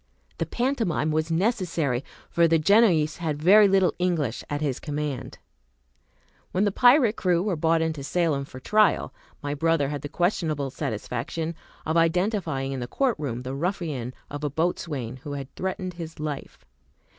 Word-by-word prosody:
The - - -1
pantomime 230 - 0
was 155 +1 0
necessary, 165 - 0 0.3
for 170 0 +4
the 165 0 +4
Genoese 165 -3 +4
had 155 -4 -2
very 200 +6 +7
little 190 -2 +3
English 165 -10 0
at 145 - -2
his 145 -4 -1
command. 145 -3 -4 1.1
When 185 - +1
the 205 - +2
pirate 245 0 +5
crew 180 -2 +1
were 200 -3 0
brought 160 +1 +2
into 160 -3 -3
Salem 145 -1 0
for 130 - -11
trial, 215 +10 +2 0.3
my 145 0 -2
brother 150 -1 +1
had 145 -2 -4
the 145 - -6
questionable 155 -6 0
satisfaction 135 +5 -3 0.3
of 160 +1 +1
identifying 165 -5 +1
in 135 - -3
the 120 - -4
court 260 - +1
room 125 -5 -3
the 130 +1 -4
ruffian 150 -6 -3 0.2
of 145 +1 -6
a 150 - 0
boatswain 145 -5 -2
who 145 +2 -7
had 140 -2 -6
threatened 185 -1 -3
his 165 -2 -8
life. 145 - -6
160 Hz, 160 wpm, -25 LUFS, 145-180 Hz, 1.1 s, very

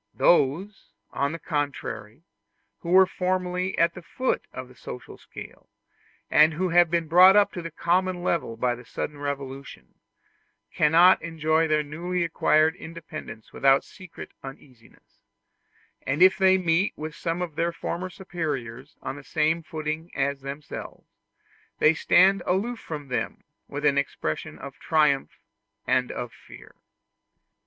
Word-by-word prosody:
Those, 175 +6 +2 0.2
on 140 +1 -1
the 165 - -5
contrary, 145 - -4 0.6
who 170 - -7
were 190 +1 +7
formerly 185 0 -2
at 170 0 +3
the 180 - -10
foot 255 +9 -2
of 130 0 -7
the 125 - -16
social 125 -1 -9
scale, - - -12 0.6
and 155 +1 +5
who 185 +3 -1
have 175 0 +5
been 170 -1 0
brought 180 +4 +7
up 205 -1 +4
to 175 - -5
the 165 - -6
common 175 +2 0
level 165 -10 -1
by 125 +1 +1
a 120 0 -10
sudden 145 +4 -5
revolution, 140 -1 -6 0.8
cannot 170 +5 +5
enjoy 160 0 +1
their 155 -1 +2
newly 170 +4 -3
acquired 160 0 +2
independence 160 -8 -9
without 135 0 +4
secret 185 -2 -12
uneasiness; 135 -3 -14 0.8
and 145 +6 +2
if 190 0 +7
they 190 -1 +4
meet 180 +1 +1
with 155 0 -6
some 170 +3 -3
of 170 -3 -6
their 170 +2 0
former 175 +2 -4
superiors 160 -10 -5
on 135 - -5
the 145 - -11
same 155 +3 0
footing 155 +1 -5
as 140 0 -1
themselves, 140 +2 -8 0.7
they 155 - +5
stand 185 +4 +4
aloof 220 +6 0
from 150 -3 -7
them 120 -3 -3 0.2
with 145 +1 -5
an 140 -1 +4
expression 80 - -4
of - - -10
triumph 150 -4 +1 0.5
and 125 0 +1
of 120 - -5
fear. - - -15
160 Hz, 145 wpm, -25 LUFS, 140-180 Hz, 0.8 s, were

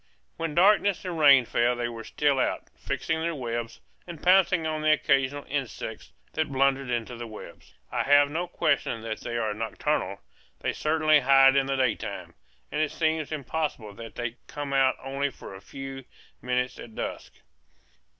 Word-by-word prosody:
When 165 -2 -4
darkness 200 +1 +4
and 175 -3 -3
rain 140 -4 +7
fell 120 +2 +1
they 120 0 -2
were 115 -1 -7
still 145 +3 +1
out, - - -1
fixing 160 0 -2
their 165 0 -1
webs, 120 -3 -4 0.3
and 170 -3 -8
pouncing 180 -2 +4
on 155 -1 -2
the 155 0 +3
occasional 140 -1 +1
insects 130 -5 -5 0.2
that 155 -2 -1
blundered 135 0 +1
into 120 0 -2
the 120 0 -7
webs. 110 -1 -12 0.2
I - - 0
have 145 0 +5
no 175 +3 -2
question 140 -8 0
that 110 -1 -4
they 120 0 -4
are 110 -2 -1
nocturnal; 110 -1 -2 0.4
they - - -1
certainly 155 -1 +3
hide 135 0 +6
in 135 -1 +3
the 135 - 0
daytime, 130 -4 -2 0.4
and - - 0
it 155 - +1
seems 160 -2 -1
impossible 145 -7 -3
that 115 +2 -10
they 120 -1 -3
can 120 - -30
come 145 -2 -5
out 135 -1 +4
only 135 +1 -1
for 125 - -11
a 95 - -10
few 135 +5 -8 0.4
minutes 125 0 -1
at 110 -2 -10
dusk. - - -5
135 Hz, 175 wpm, -27 LUFS, 120-155 Hz, 0.4 s, rain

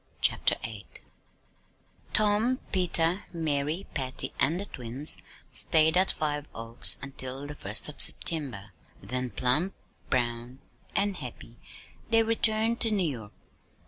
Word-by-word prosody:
CHAPTER - - +2
VIII 110 -3 -7 1.2
Tom, 215 +4 +2
Peter, 180 0 +2
Mary, 155 +2 -2
Patty, 130 -3 0
and 170 +4 +1
the 200 - -4
twins 130 0 -4 0.3
stayed 160 0 +5
at 185 +1 +5
Five 150 -1 -3
Oaks 115 +1 +3
until 135 0 -5
the 145 - -6
first 105 -6 0
of 150 - -6
September, 125 - +1 0.3
then, 125 0 -3
plump, 140 +12 0 0.3
brown, 120 0 -2 0.4
and 200 -1 +1
happy 120 -4 -9 0.5
they 225 0 +5
returned 225 0 +1
to 230 - +4
New 200 -5 +1
York. 115 -8 -7
150 Hz, 120 wpm, -28 LUFS, 125-190 Hz, 1.2 s, stayed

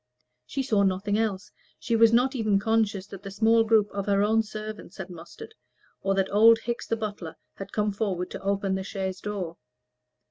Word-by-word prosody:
She 275 - -2
saw 215 -6 +2
nothing 195 +1 +1
else; 210 -3 -1 0.3
she 235 - -1
was 225 0 +6
not 250 +4 +3
even 215 -6 +1
conscious 210 -2 0
that 195 -2 -10
the 200 - -7
small 225 +3 +3
group 220 -2 +3
of 200 0 -4
her 200 0 +3
own 220 +2 +3
servants 215 0 -8
had 190 -2 -7
mustered, 180 - -11 0.5
or 195 0 0
that 195 -1 0
old 225 +2 +7
Hickes 235 0 -4
the 230 - 0
butler 205 -7 -5 0.2
had 195 - -8
come 210 -1 0
forward 195 -4 -2
to - - -7
open 195 0 0
the 190 - -1
chaise 190 -2 -4
door. 190 -5 -4
205 Hz, 190 wpm, -26 LUFS, 195-225 Hz, 0.5 s, old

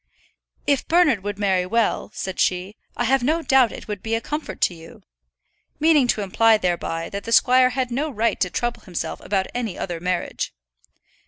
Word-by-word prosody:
"If 280 -2 +1
Bernard 335 - +3
would 205 -1 -4
marry 190 -3 +1
well," 230 +2 0
said 190 -1 -5
she, 185 +3 0 0.2
"I - - 0
have 265 +2 +2
no 315 +6 +1
doubt 265 -6 +4
it - - -9
would 205 -3 -5
be 225 0 -1
a - - 0
comfort 300 +6 -5
to - - +3
you," 165 -1 -14 0.8
meaning 305 -4 +4
to 220 - +1
imply 220 +3 +4
thereby 170 -3 -2
that 200 0 -5
the 230 - -6
squire 255 +2 +5
had 255 -1 -2
no 285 +6 -1
right 230 -3 0
to 180 - +1
trouble 240 +5 -2
himself 175 -3 -5
about 190 -1 0
any 230 -6 -3
other 175 -3 -4
marriage. 180 - -3
225 Hz, 185 wpm, -22 LUFS, 190-255 Hz, 0.8 s, squire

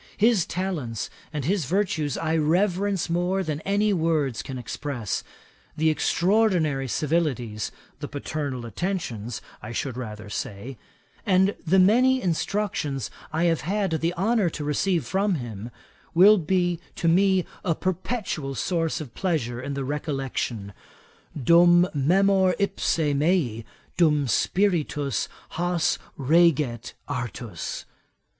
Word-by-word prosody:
His 215 -3 +3
talents 160 - -3 0.2
and 150 -4 -3
his 185 -1 +1
virtues 160 -4 0
I 160 0 0
reverence 185 +4 +1
more 180 +3 0
than 155 -3 -3
any 205 +2 +1
words 160 -8 0
can 130 - -6
express. 125 -2 -4 0.5
The 160 +1 +3
extraordinary 170 -6 +2
civilities 130 -7 -1 0.3
(the 145 - -5
paternal 145 -3 -4
attentions 120 - -4 0.2
I - - -7
should 125 0 -3
rather 105 -4 -6
say,) 105 +5 -6 0.4
and 190 -1 +3
the 190 +4 +4
many 245 +8 +5
instructions 170 - -1 0.2
I 160 +2 0
have 165 -2 +2
had 195 +3 -1
the 165 +1 0
honour 200 +1 +2
to 155 - -6
receive 165 +4 0
from 195 0 +1
him, 115 -5 -6 0.5
will 200 +4 +7
to 165 - -7
me 175 -2 +2 0.2
be 185 +1 +3 0.2
a 170 -3 +1
perpetual 185 - -3
source 165 +2 -1
of 130 -7 -9
pleasure 130 -11 -1
in 140 +1 -4
the 135 -1 -3
recollection, 135 - -3 0.7
'"Dum 175 +5 +6
memor 185 +5 +3
ipse 200 -3 0
mei, 145 - +1 0.3
dum 150 -5 +3
spiritus 150 - 0 0.2
has 175 0 0 0.2
reget 140 -5 +2
artus. 120 -4 -5
160 Hz, 120 wpm, -25 LUFS, 135-185 Hz, 0.7 s, will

